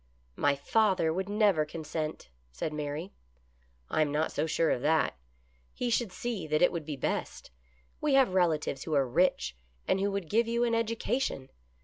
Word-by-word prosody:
" -, -, -38 dB
My 145 Hz, -1 st, +2 dB
father 185 Hz, +1 st, +2 dB
would 190 Hz, +3 st, -3 dB
never 205 Hz, -6 st, +3 dB
consent," 155 Hz, -, -5 dB, 0.2 s
said 110 Hz, -, -4 dB
Mary. 150 Hz, +5 st, -4 dB, 0.4 s
" 60 Hz, 0 st, -37 dB
I -, -, +2 dB
am 150 Hz, -2 st, +2 dB
not 155 Hz, +2 st, 0 dB
so 160 Hz, -, -1 dB
sure 165 Hz, +1 st, +2 dB
of 120 Hz, -, 0 dB
that. 155 Hz, +3 st, +2 dB, 0.6 s
He 245 Hz, -1 st, -1 dB
should 230 Hz, -3 st, +1 dB
see 215 Hz, -6 st, -4 dB
that 155 Hz, +2 st, +2 dB
it -, -, +5 dB
would 170 Hz, -3 st, -4 dB
be 150 Hz, -1 st, -4 dB
best. 135 Hz, -, -3 dB, 0.5 s
We 295 Hz, -3 st, +2 dB
have 265 Hz, -8 st, +4 dB
relatives 160 Hz, -6 st, +1 dB
who 155 Hz, -, -1 dB
are 135 Hz, -2 st, +3 dB
rich, 120 Hz, -, +1 dB, 0.3 s
and 190 Hz, -, +2 dB
who 200 Hz, +1 st, +1 dB
would 200 Hz, -4 st, -3 dB
give 225 Hz, +6 st, +2 dB
you 235 Hz, +1 st, +1 dB
an 235 Hz, -1 st, +1 dB
education. 230 Hz, -, -1 dB
160 Hz, 190 wpm, -30 LUFS, 150-210 Hz, 0.6 s, it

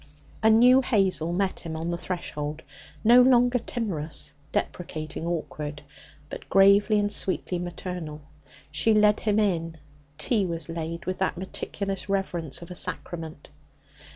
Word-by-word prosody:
A 220 Hz, -, +5 dB
new 250 Hz, +4 st, +7 dB
Hazel 190 Hz, -9 st, +1 dB
met 190 Hz, +2 st, -1 dB
him 165 Hz, -2 st, -6 dB
on 165 Hz, +2 st, -3 dB
the -, -, -1 dB
threshold, 155 Hz, -4 st, -4 dB, 0.4 s
no 240 Hz, +3 st, +8 dB
longer 250 Hz, -1 st, +4 dB
timorous, 185 Hz, -10 st, -3 dB, 0.2 s
deprecating, 160 Hz, -1 st, -4 dB
awkward, 150 Hz, -3 st, -4 dB, 0.4 s
but -, -, -9 dB
gravely 200 Hz, +2 st, +5 dB
and 205 Hz, 0 st, +1 dB
sweetly 185 Hz, -3 st, -1 dB
maternal. 175 Hz, -3 st, -6 dB, 0.5 s
She 220 Hz, -1 st, +2 dB
led 210 Hz, 0 st, +4 dB
him 210 Hz, -1 st, +1 dB
in. 165 Hz, -6 st, 0 dB, 0.4 s
Tea 210 Hz, +7 st, +1 dB
was 165 Hz, -1 st, -4 dB
laid 165 Hz, 0 st, -5 dB
with 185 Hz, +1 st, -3 dB
the 190 Hz, -, +1 dB
meticulous 195 Hz, +2 st, -4 dB
reverence 175 Hz, -6 st, -2 dB
of 170 Hz, -, -11 dB
a -, -, -6 dB
sacrament. 165 Hz, -4 st, -3 dB
180 Hz, 135 wpm, -26 LUFS, 165-210 Hz, 0.5 s, no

